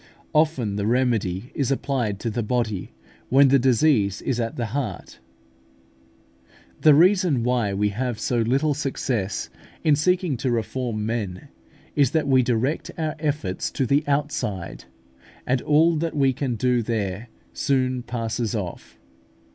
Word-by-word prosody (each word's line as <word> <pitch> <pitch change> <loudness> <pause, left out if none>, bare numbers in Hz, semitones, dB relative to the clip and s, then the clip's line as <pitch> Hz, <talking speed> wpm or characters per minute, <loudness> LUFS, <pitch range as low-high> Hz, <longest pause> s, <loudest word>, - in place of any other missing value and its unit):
Often 145 -10 +1
the 100 0 -1
remedy 115 -4 0
is 140 -3 -1
applied 130 -7 -1
to 115 - -2
the 120 - -2
body, 110 -4 -2 0.4
when 135 +1 +6
the 135 +1 +5
disease 120 -5 +3
is 125 -2 -1
at 115 -1 -2
the 120 - -2
heart. 140 -1 -4 1.6
The 155 -2 +6
reason 175 - +4
why 120 -5 0
we 105 +1 +1
have 120 +2 -3
so 120 - 0
little 135 +7 +2
success 130 -8 -2 0.3
in 155 -2 +4
seeking 180 -1 +1
to 125 +2 -1
reform 115 -1 -2
men, 110 +1 -4 0.5
is 140 -4 +4
that 155 -3 +1
we 130 -2 +5
direct 125 +4 -1
our 155 -2 -1
efforts 145 - -2
to 135 - 0
the 140 +4 +2
outside, 140 - -2 0.6
and 125 0 +1
all 160 +3 +3
that 165 +1 -2
we 135 -2 +3
can 130 -1 -2
do 125 +2 +1
there 110 -1 -3 0.2
soon 130 -2 0
passes 115 -1 -3
off. 95 -5 -6
125 Hz, 145 wpm, -23 LUFS, 110-140 Hz, 1.6 s, when